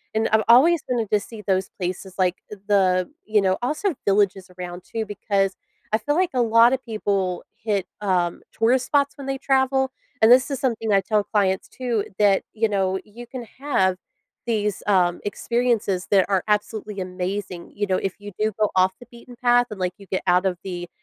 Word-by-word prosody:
and 220 - +2
I've 220 0 +3
always 290 +8 +6
wanted 235 -4 -1
to 210 - +4
see 220 +1 -10
those 190 -1 0
places 185 +1 -4
like 185 -1 +2
the, 195 -3 +1 0.2
you 215 -1 +2
know 190 -1 +1
also 305 +8 -1
villages 195 -2 +2
around 180 0 -7
too, 225 -1 -4
because 200 -2 -1 0.4
I 215 - +3
feel 290 +7 -1
like 365 0 +1
a 250 - +2
lot 230 +1 +5
of 265 - -2
people 200 -5 -2
hit, 205 -4 -1 0.2
um, 180 -4 0
tourist 245 +3 +2
spots 285 0 +1
when 275 -1 -8
they 270 0 -1
travel- 265 0 +1 0.3
and 220 +2 +7
this 255 +3 +6
is 275 - -2
something 225 -4 -1
I 195 -1 +4
tell 210 +1 +1
clients, 195 -3 0
too- 240 -5 -2
that, 200 -2 +4
you 225 +1 +1
know, 190 -2 0
you 235 +3 -11
can 245 0 -7 0.2
have 190 -10 +1 0.5
these, 210 -3 -1
um, 180 -3 +2
experiences 215 -3 0
that 195 -2 +5
are 190 -3 +1
absolutely 210 -1 -1
amazing, 185 0 -4
you 205 - 0
know, 185 - +1
if 195 +1 -4
you 205 0 -9
do 215 +1 +1
go 210 - +2
off 185 0 +4
the 245 - -12
beaten 240 +1 -13
path 245 0 +3
and, 210 -3 -8
like, 180 -1 -1
you 200 - -15
get 190 - -2
out 180 +1 +4
of 180 -2 -2
the, 175 -2 -6
210 Hz, 195 wpm, -23 LUFS, 190-235 Hz, 0.5 s, and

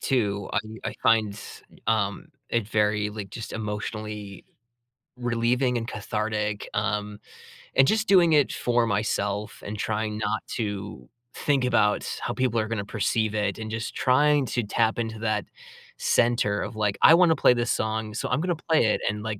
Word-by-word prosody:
too. 100 -7 0
I - - +2 0.3
I - - -11
find, 110 -2 +3 0.5
um, 110 +7 0 0.2
it 115 -3 0
very, 105 -1 +1
like, 105 -2 -7
just 115 - -7
emotionally 105 -2 -5 0.7
relieving 120 +1 +1
and 115 - -6
cathartic, 105 -1 -3
um, 105 -1 -2 0.6
and 135 - +6
just 220 0 +1
doing 175 -4 +6
it 145 -2 +4
for 120 -1 +1
myself 105 -1 -2
and 105 +1 -5
trying 105 0 -2
not 110 0 -2
to 100 - -4 0.3
think 140 -3 +1
about 110 -4 +2 0.2
how - - -2
people 125 -3 0
are 110 - -1
gonna 110 -3 -2
perceive 110 +1 0
it 105 -2 -1
and 110 -1 -6
just 110 -1 -4
trying 145 +2 +3
to 120 - -1
tap 110 +2 0
into 110 -1 -3
that 110 -2 -1 0.5
center 115 -4 +2
of, 110 +1 -5
like, 105 -2 0
"I - - +9
wanna 170 -1 +5
play 125 - +5
this 120 0 0
song, 110 0 -2
so 105 - -3
I'm 135 +6 0
gonna 175 -1 0
play 155 -8 +4
it," 105 - +1
and, 105 +1 -4
like, 110 -2 -4
110 Hz, 165 wpm, -26 LUFS, 105-120 Hz, 0.7 s, I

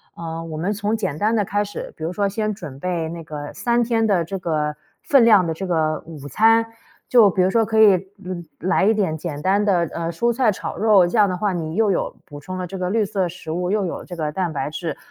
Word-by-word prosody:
呃， 165 0 -6
我 160 -2 -6
们 175 +6 -1
从 210 +1 -1
简 190 -9 -3
单 220 +5 +1
的 210 - +2
开 205 +2 0
始， 205 0 -7
比 160 - -8
如 165 - -2
说 200 +1 0
先 215 +1 -2
准 150 -9 -9
备 175 -2 -2
那 165 0 -7
个 150 -2 -7
3 240 0 +1
天 225 -1 +1
的 190 -5 +2
这 195 +4 -4
个 150 -4 -1 0.3
分 270 -5 +4
量 210 -5 +6
的 160 - -1
这 190 - -5
个 160 -3 0
午 150 -4 -9
餐， 225 - +4 0.5
就 225 -6 +6
比 185 - +1
如 185 - +3
说 225 +2 +2
可 220 0 +2
以 205 -3 +7 0.6
来 185 +4 +1
来 - - +3
一 220 - +4
点 185 -7 0
简 150 -3 -5
单 200 +3 +2
的， 175 -5 +2
呃， 170 0 -2
蔬 235 +6 +1
菜 235 -2 +2
炒 190 - -6
肉。 205 -5 +5
这 220 - -2
样 210 - +6
的 185 - -2
话， 205 +2 0
你 165 -3 -4
又 220 +1 +2
有 190 - -1
补 145 -1 -10
充 185 +6 -7
了 180 - -4
这 190 - -7
个 185 0 -2
绿 220 -1 +2
色 195 -2 -1
食 175 -2 -10
物， 180 +3 -1
又 205 -2 +1
有 - - -6
这 180 - -8
个 155 -3 -2
蛋 175 -1 -2
白 135 0 -2
质。 160 0 -4
185 Hz, 275 characters per minute, -21 LUFS, 165-210 Hz, 0.6 s, 以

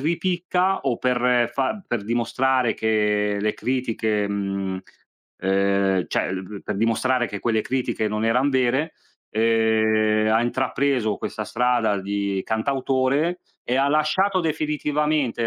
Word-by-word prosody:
ripicca 180 +4 0
o 125 -4 -1
per 125 -1 +2
fa 135 - -1
per 115 -4 -2
dimostrare 120 +2 +1
che 105 -2 +1
le 105 0 0
critiche, 110 -5 -1
mhmm, 100 -2 -2 0.6
ehm, 95 -1 +1
cioè - - -1
l 95 0 -4
b 100 +1 -9
per 105 - -4
dimostrare 120 +3 +1
che 105 - -6
quelle 110 -2 +1
critiche 125 -4 -1
non 105 +1 -2
eran 125 +5 +2
vere, 130 +4 +1 0.4
ehm, 110 -1 +2
ha 115 +1 +3
intrapreso 130 -3 0
questa - - -5
strada 120 -4 +1
di 100 -1 -2
cantautore 135 +7 0 0.3
e 125 - +1
ha 140 +1 +3
lasciato 180 +6 +2
definitivamente 150 -5 0
120 Hz, 130 wpm, -23 LUFS, 105-135 Hz, 0.6 s, ha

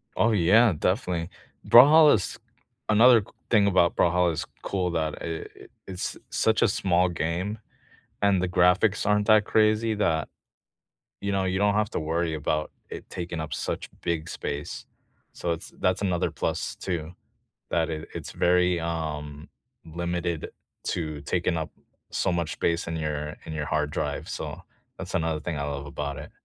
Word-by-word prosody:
Oh 115 - +3
yeah, 105 +3 +5
definitely. 90 -2 -1 0.4
Brawlhalla 150 +5 +8
is 95 - -3 0.5
another 115 +1 +7
c - - -15 0.2
thing 105 -4 +4
about 90 -3 +3
Brawlhalla 90 0 +3
is - - -3 0.2
cool 90 -3 -1
that 80 -2 -1
i - - -5 0.3
it - - -14 0.2
it's 90 -1 -4
such - - +1
a - - +5
small 90 -1 +2
game 85 +5 -2 0.6
and 100 -2 +3
the 90 - 0
graphics 90 +4 +3
aren't 105 0 +2
that 110 -2 +5
crazy 110 +1 +2
that 80 -8 0 0.9
you 100 0 -1
know, 95 -1 0
you 95 0 0
don't 105 0 +3
have 105 -1 +1
to - - -2
worry 80 +1 -1
about 75 0 -1 0.2
it - - -9
taking 85 -1 -5
up 80 -1 -4
such - - -4
big 80 -1 -2
space. 70 +1 -5 0.5
So 85 - -3
it's 80 - -8
that's 90 +1 +1
another 90 -4 0
plus, - - -3
too, 85 -3 -4 0.6
that 85 -1 +1
it 80 -1 -5
it's - - -6
very, 90 0 +2
um, 75 -3 -4 0.4
limited 85 0 -3 0.4
to 75 -4 -3
taking 85 +3 0
up 80 - -4 0.4
so 90 - 0
much 85 -3 -1
space 85 0 -1
in 80 - -3
your 75 0 -3
in - - -7
your 75 -1 -3
hard 75 -1 0
drive, - - -3
so - - -6 0.4
that's - - -7
another 80 -1 0
thing 80 -1 -4
I 70 - -2
love 70 0 -4
about 70 0 -4
it. 75 - -9
85 Hz, 165 wpm, -26 LUFS, 80-95 Hz, 0.9 s, Brawlhalla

